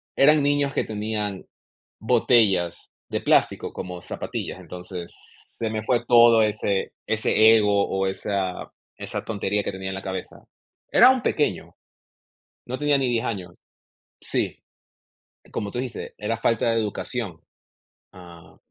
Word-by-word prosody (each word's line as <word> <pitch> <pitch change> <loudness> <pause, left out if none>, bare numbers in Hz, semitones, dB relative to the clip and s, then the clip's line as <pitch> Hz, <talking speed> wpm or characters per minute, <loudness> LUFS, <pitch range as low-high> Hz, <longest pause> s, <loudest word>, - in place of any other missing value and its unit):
Eran 150 +1 +5
niños 145 0 +2
que - - 0
tenían 105 -2 -3 0.6
botellas 110 -6 +2 0.2
de - - -1
plástico, - - +2
como 90 -1 -6
zapatillas, - - -5
entonces 90 -1 -8 0.5
se 115 - -1
me 110 0 -3
fue 120 0 +1
todo 115 -2 +7
ese 105 -2 0
ese 110 0 +4
ego 105 -2 +2
o 95 0 0
esa 95 -1 -3 0.2
esa - - -5
tontería 105 -1 -1
que - - -2
tenía 95 0 -6
en - - -4
la 95 - -6
cabeza. 95 -1 -5 0.6
Era 255 - +8
un 260 -2 +1
pequeño, 150 - -1 0.9
no 130 - -3
tenía 145 -1 +2
ni 130 - 0
10 120 0 0
años. 95 -7 -4 0.7
Sí, - - -1 0.9
como 105 - -3
tú - - -5
dijiste, 125 -3 -5
era 110 +2 -2
falta 115 0 +1
de 115 - +2
educación, 105 -3 -3 0.8
ah 85 -3 -14
110 Hz, 140 wpm, -24 LUFS, 95-120 Hz, 0.9 s, Era